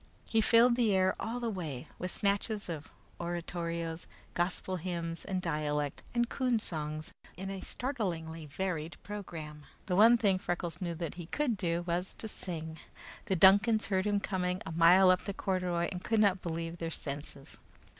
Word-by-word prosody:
He 225 - +3
filled 235 +2 +6
the 225 -5 +3
air 185 0 +3
all 230 +2 -3
the 240 - -2
way 155 -10 -5
with 180 - -2
snatches 200 +1 0
of 160 -2 -5 0.3
oratorios, 170 -1 -3 0.3
gospel 180 +1 -1
hymns, 170 -1 -4
and 185 -1 -2
dialect 150 -3 -1
and 240 0 +3
coon 250 -2 +1
songs, 155 -5 -3 0.3
in 195 +1 -4
a 195 -1 -5
startlingly 170 - -3
varied 165 0 -3
programme. 165 -7 -7 0.2
The 180 - 0
one 225 +5 +7
thing 200 -5 +2
Freckles 175 -2 -3
knew 170 -2 -2
that 165 -1 -4
he 165 - -9
could 265 - 0
do 175 -3 -1
was 175 +2 -2
to 220 - -5
sing. 160 -6 -5 0.5
The 190 - +2
Duncans 200 +5 +6
heard 190 0 +1
him 205 -1 +2
coming 185 -2 -1
a - - -5
mile 175 +3 +7
up 180 - +1
the 200 - -3
corduroy 180 -4 0
and 180 - -5
could 225 -1 +1
not 200 -3 +4
believe 165 0 -4
their 165 - -2
senses. 140 -2 -7
180 Hz, 170 wpm, -32 LUFS, 165-200 Hz, 0.5 s, one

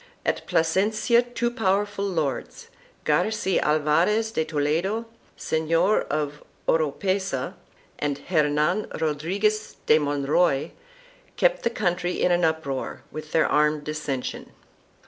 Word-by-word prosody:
At - - -1
Plasencia 215 +8 +2
two 240 -1 -2
powerful 205 -3 0
lords, 170 - -3 0.4
Garci 215 -4 +1
Alvarez 165 +9 +2
de 160 - 0
Toledo, 160 +9 -1 0.3
Senor 165 +6 +2
of 150 0 -2 0.3
Oropesa, 165 -1 0 0.5
and 145 -1 -1
Hernan 155 +4 +1
Rodriguez 190 +8 0
de 155 - +5
Monroy, 145 +1 +1 0.7
kept - - +3
the - - +1
country 180 -5 -1
in 180 - +3
an 175 0 +2
uproar 160 -5 -2
with 155 0 -8
their 160 - +3
armed 150 0 +2
dissension. 150 -4 -4
165 Hz, 105 wpm, -25 LUFS, 150-205 Hz, 0.7 s, de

